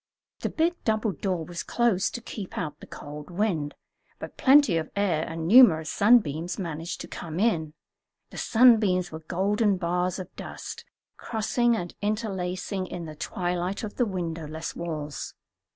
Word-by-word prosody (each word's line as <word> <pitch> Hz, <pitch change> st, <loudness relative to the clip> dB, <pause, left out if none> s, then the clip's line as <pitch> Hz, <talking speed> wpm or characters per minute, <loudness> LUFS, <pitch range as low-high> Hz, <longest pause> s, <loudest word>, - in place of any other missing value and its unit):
The -, -, -2 dB
big 335 Hz, +2 st, 0 dB
double 215 Hz, -1 st, +1 dB
door 185 Hz, -4 st, -2 dB
was 170 Hz, +1 st, -5 dB
closed 235 Hz, -6 st, +1 dB
to 240 Hz, -, -5 dB
keep 210 Hz, -4 st, -7 dB
out 150 Hz, -3 st, -4 dB
the -, -, -12 dB
cold 150 Hz, +2 st, -9 dB
wind, 175 Hz, -6 st, -1 dB, 0.4 s
but -, -, -8 dB
plenty 275 Hz, -, +5 dB
of 160 Hz, -1 st, -3 dB
air 185 Hz, -6 st, +1 dB
and 165 Hz, 0 st, -4 dB
numerous 175 Hz, -9 st, +7 dB
sunbeams 175 Hz, -7 st, +3 dB
managed 165 Hz, -2 st, -4 dB
to -, -, -7 dB
come 165 Hz, 0 st, -6 dB
in. 165 Hz, -8 st, +1 dB, 0.6 s
The -, -, -7 dB
sunbeams 215 Hz, -7 st, +4 dB
were 160 Hz, -, -6 dB
golden 195 Hz, +5 st, +1 dB
bars 180 Hz, +1 st, 0 dB
of 185 Hz, -2 st, -8 dB
dust, -, -, -8 dB, 0.3 s
crossing 235 Hz, +2 st, +1 dB
and 175 Hz, -5 st, -4 dB
interlacing 195 Hz, -3 st, -2 dB
in 175 Hz, -2 st, -6 dB
the 155 Hz, -, -7 dB
twilight 180 Hz, +5 st, -2 dB
of 210 Hz, -, -6 dB
the 245 Hz, -, +3 dB
windowless 165 Hz, -4 st, -4 dB
walls. 155 Hz, -4 st, -5 dB
180 Hz, 150 wpm, -27 LUFS, 165-215 Hz, 0.6 s, numerous